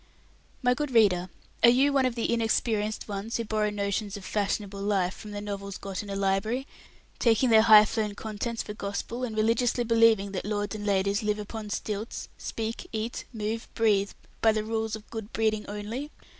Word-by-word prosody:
My 250 0 +4
good 295 +2 -2
reader, 195 -7 +4 0.3
are 235 - +8
you 270 +4 +4
one 270 -2 +4
of 245 - -3
the 235 0 0
inexperienced 220 -2 0
ones 205 +2 -3
who 230 - -2
borrow 215 -1 0
notions 205 0 -2
of 195 - -10
"fashionable 200 -1 -2
life" 195 -3 +1
from 215 - -10
the 205 0 -5
novels 200 -1 -5
got 195 -1 -5
in 205 - -9
a 200 - -3
library, 200 +6 0 0.5
taking 235 +1 +3
their 220 -1 +8
high 215 -1 +8
flown 210 -1 -2
contents 220 +2 -4
for 210 - -6
gospel, 210 +4 -4
and 225 -3 -3
religiously 230 +2 +2
believing 225 -3 +4
that 190 - -3
lords 205 0 -2
and 210 -1 -5
ladies 200 0 +2
live 210 -1 0
upon 210 0 -6
stilts, 210 +2 -4
speak, 225 0 -5
eat, 220 +2 -3
move, 225 0 -3
breathe, 205 -3 +2 0.3
by 225 - +6
the 215 -1 -1
rules 220 0 -2
of 215 -1 -11
good 220 -2 -6
breeding 215 -1 0
only? 210 +8 -5
215 Hz, 185 wpm, -28 LUFS, 205-230 Hz, 0.5 s, are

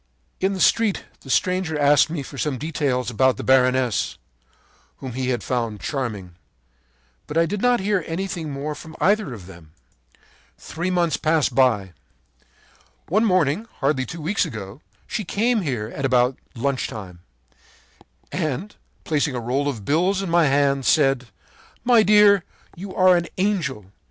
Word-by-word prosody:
“In 190 +1 +1
the 190 - -5
street 220 +1 +2
the 135 - -14
stranger 180 +1 0
asked 145 +1 +4
me 155 -3 -4
for 135 0 -9
some 145 -4 -1
details 140 -4 -1
about 130 0 +2
the - - -5
baroness, 130 -2 +2 0.8
whom 130 -3 -7
he 130 +1 -2
had 120 -4 -1
found 115 -4 -2
charming. 105 - -4 0.9
But 150 - -4
I 165 - +4
did 200 +4 -3
not 245 -1 +3
hear 200 -2 0
anything 170 -2 -4
more 145 +2 -4
from 160 +2 -11
either 205 -5 +2
of 105 -7 -9
them. 85 -4 -14 0.8
“Three 175 +3 -4
months 175 -3 +1
passed 155 -4 +1
by. 115 -8 +2 1.2
“One 215 +7 +3
morning, 185 +1 +1
hardly 135 -2 -1
two 165 - -7
weeks 195 +5 +1
ago, 105 +3 -7 0.2
she 215 - -3
came 220 +5 +1
here 120 - -3
at 140 - -5
about 125 -1 +2 0.2
lunch 130 +2 -1
time, 95 -5 -9 1.1
and, 170 +4 -3 0.3
placing 150 -3 0
a - - -2
roll 130 +5 -1
of 115 -8 -4
bills 185 +6 +1
in 180 - -4
my 170 -2 +4
hand, 140 0 +2
said: 135 -3 +2 0.6
'My 240 -2 +5
dear, 210 -2 +5 0.3
you 190 +2 -8
are 185 -1 +5
an 170 -1 0
angel! 160 - -1
145 Hz, 155 wpm, -22 LUFS, 125-185 Hz, 1.2 s, My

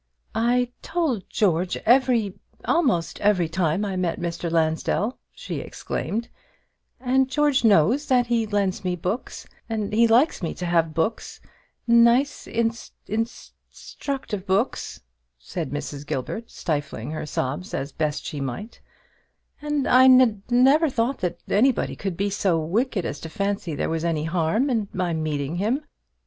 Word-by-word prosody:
"I 245 +2 +1
told 320 - -2
George 180 -3 +1
every 240 -5 +3 0.3
almost 175 - +1
every 200 -5 +3
time 170 +3 0
I 195 -2 -3
met 180 -2 -1
Mr. 170 0 -3
Lansdell," 165 +8 0
she - - -6
exclaimed; 230 +3 -4 0.7
"and 260 +1 +2
George 290 -1 +2
knows 225 - +4
that 250 -2 +3
he 235 -2 0
lends 200 -3 -1
me 180 -1 -1
books; 180 +8 -4 0.2
and 215 -2 -2
he 230 +2 +5
likes 245 +6 +3
me 165 - -3
to 180 - -5
have 165 -2 +1
books 165 +8 -2 0.5
nice, 235 +4 +4
in 230 0 +1
st 225 -1 -4 0.4
structive 230 -8 -5
books," 200 +7 -1 0.4
said - - -5
Mrs. 145 0 -5
Gilbert, 220 - -4
stifling 150 -2 -3
her 155 -1 -4
sobs 145 +7 -3
as 140 +2 -3
best 150 0 -2
she 145 - -4
might; 135 - -6 0.8
"and 295 -2 -1
I 255 +1 +6
n 255 -5 +6
never 270 +6 +5
thought 250 +1 -1
that 175 -1 -2
anybody 245 +4 +2
could 195 -4 -4
be 200 +1 0
so 190 -3 +1
wicked 200 - -1
as 140 - -4
to 165 - -7
fancy 200 -4 -2
there - - -1
was 160 0 -2
any 165 -3 0
harm 170 - +1
in 220 -4 0
my 180 -2 -1
meeting 155 -1 -2
him. 230 +10 0
205 Hz, 150 wpm, -24 LUFS, 165-245 Hz, 0.8 s, I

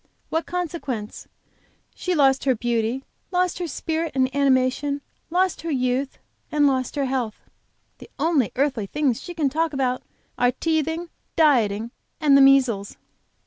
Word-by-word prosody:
what 325 0 -1
consequence? 315 -11 -4 0.7
She 365 -1 -2
lost 270 -3 +3
her 260 -2 +3
beauty, 235 +2 -1 0.3
lost 360 -1 0
her 350 - -2
spirit 320 +1 -3
and 260 0 +1
animation, 280 +1 +2 0.3
lost 365 +2 +1
her 330 - -4
youth, 260 -1 -1 0.3
and 300 -1 +3
lost 260 -1 +1
her 280 -1 0
health. 255 -5 -2 0.6
The - - -12
only 295 -6 +2
earthly 265 -6 0
things 275 -1 0
she 350 - -8
can 310 -4 +1
talk 320 +1 0
about 255 -2 0 0.4
are 245 0 +3
teething, 320 +3 -1 0.3
dieting, 235 -8 +3 0.3
and 295 -4 +5
the 275 - +7
measles!" 260 -7 +4
275 Hz, 145 wpm, -23 LUFS, 255-320 Hz, 0.7 s, the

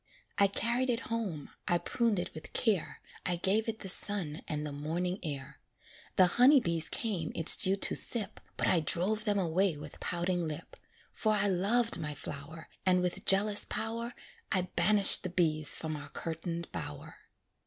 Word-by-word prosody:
I 200 - +6
carried 235 +6 0
it 235 -2 0
home, 190 -11 -4 0.2
I 175 - +2
pruned 230 +3 -1
it 180 +1 -4
with 155 - -9
care, 210 -8 0 0.2
I 180 - 0
gave 200 +6 0
it 220 -1 -6
the - - -7
sun 185 -5 +1
and 150 0 -3
the 150 - -5
morning 170 +6 -3
air. 140 -5 -7 0.6
The 185 - +6 0.2
honey 275 +3 +7
bees 170 -7 -1
came 190 -9 -3
its 165 - +8
dew 190 +1 +6
to 195 - 0
sip, 230 -4 +1 0.2
But - - -1
I 175 - +3
drove 195 +7 -1
them 205 -2 +1
away 180 -1 0
with 150 0 -10
pouting 175 -1 -2
lip; 155 +1 -8 0.4
For 215 -1 0
I 205 -1 +1
loved 210 +5 +1
my 150 -2 -5
flower, 145 +3 -8 0.2
And 180 -1 +3
with 195 +3 -3
jealous 205 +2 +4
power 230 +2 -4 0.4
I 185 - +2
banished 200 +3 +5
the 185 - -4
bees 155 -4 +2
from 155 -1 -4
our 145 -1 -8
curtained 165 +2 -5
bower. 75 - -7
180 Hz, 175 wpm, -31 LUFS, 160-210 Hz, 0.6 s, its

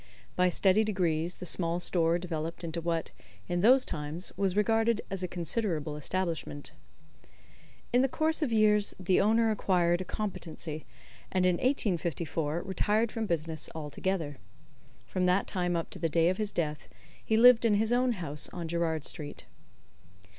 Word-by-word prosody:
By 180 0 +3
steady 190 +4 +3
degrees 175 -5 0
the 180 - -8
small 170 -1 -1
store 170 -1 +2
developed 165 -1 -4
into 170 0 -4
what, 165 -1 -2 0.4
in 175 - -1
those 255 +7 +5
times, 155 +3 -5
was 195 -2 0
regarded 225 +1 +2
as 195 -1 -3
a 180 - -2
considerable 170 -4 -2
establishment. 165 -2 -3 1.2
In 245 - +5
the 265 - +3
course 315 +4 +1
of 285 -6 0
years 210 -2 +3
the 185 0 +2
owner 225 +2 +3
acquired 175 -4 +1
a - - -2
competency, 170 -6 -5 0.4
and 185 -1 +2
in 180 -1 +3
1854 170 - -1
retired 210 +4 0
from 225 -1 -3
business 160 -2 -2
altogether. 155 0 -3 0.7
From 180 -1 -1
that 180 +2 +3
time 180 -3 -1
up 165 - -3
to - - -8
the 165 - 0
day 165 +2 +3
of 185 - -1
his 210 -1 -1
death 150 -2 -3 0.3
he 220 - +1
lived 245 0 +7
in 225 -3 +4
his 220 +2 +1
own 250 0 +2
house 150 -7 -4
on 175 -2 -5
Gerrard 160 -2 -1
Street. 150 - -5
180 Hz, 160 wpm, -30 LUFS, 165-210 Hz, 1.2 s, lived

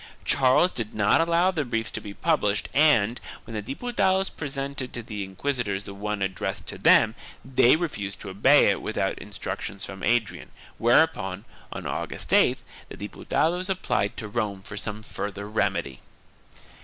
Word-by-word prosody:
Charles 135 +7 +4
did 115 -3 -2
not 105 +8 +4
allow 170 +3 +3
the 160 -5 -1
briefs 115 -4 -2
to - - -4
be 100 -2 -8
pub 165 -2 +1
lished 105 0 0
and, 125 -7 +4 0.2
when 115 - -9
the 105 - -2
Diputados 190 - 0
presented 140 -2 -4
to 120 - -5
the 105 -2 -5
inquisitors 100 0 -2
the 100 - -9
one 105 0 -3
addressed 95 -1 -3
to - - -5
them, - - +5 0.3
they 130 0 +5
refused 110 - -4
to 100 - -6
obey 95 - +5
it - - +2
without - - -1
instruc - - -6
tions 100 -1 -5
from 95 -1 -9
Adrian, 115 -4 0 0.3
whereupon, 115 - +2 0.3
on - - -6
August - - -4
8th, - - +4 0.3
the - - -9
Diputados 170 - -1
applied 185 - -1
to 110 - -5
Rome 105 -3 -3
for 100 - -8
some 105 +1 -5
further 100 -1 -5
remedy. 85 - -1
115 Hz, 165 wpm, -26 LUFS, 100-145 Hz, 0.3 s, them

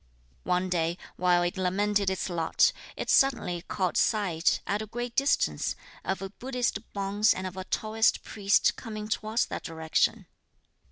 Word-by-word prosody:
One 180 +1 +1
day, 170 -1 0 0.2
while 175 -1 +3
it 175 +1 -2
lamented 200 +2 +1
its 190 -1 -2
lot, 170 -3 +2 0.3
it - - -4
suddenly 230 -10 +3
caught 185 -1 -2
sight, 185 -7 +2
at 205 +2 -1
a 215 - -5
great 240 +2 -5
distance, 275 +1 +1 0.3
of 190 0 -2
a 195 - -6
Buddhist 250 -2 -2
bonze 200 +2 +2
and 185 - -4
of 185 -1 -5
a 185 0 -6
Taoist 220 +2 +1
priest 200 -1 +2
coming 215 -3 -6
towards 215 +2 0
that - - -5
direction. 160 -1 0
195 Hz, 155 wpm, -28 LUFS, 180-215 Hz, 0.3 s, while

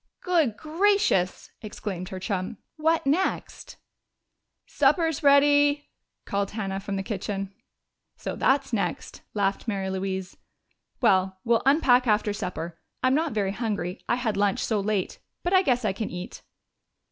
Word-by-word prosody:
"Good 325 - +2
gracious!" 330 - +1
exclaimed 195 -4 -5
her 190 - -6
chum. 185 -1 -3 0.2
"What 320 0 +1
next?" 320 +8 -1 0.9
"Supper's 325 -3 +2
ready!" 290 0 +4 0.4
called 200 0 -1
Hannah 195 -3 -3
from 200 0 -4
the 195 - -2
kitchen. 195 -1 -4 0.6
"So - - -5
that's 270 -1 +1
next," 195 -6 -2
laughed 200 +2 0
Mary 195 -3 -2
Louise. 190 0 -4 0.6
"Well, 190 -5 +3
we'll 230 -1 +3
unpack 255 -4 +4
after 210 -1 +2
supper. 175 -5 -5 0.2
I'm 255 0 +4
not 310 -1 +1
very 200 -3 0
hungry 205 -4 -3
I 240 - +3
had 235 -5 -1
lunch 200 -1 +1
so 220 -2 0
late 200 -2 -1 0.2
but 350 - 0
I 375 - +7
guess 250 -9 +1
I 195 - +1
can 215 +2 -4
eat." 180 0 -7
215 Hz, 140 wpm, -26 LUFS, 195-280 Hz, 0.9 s, I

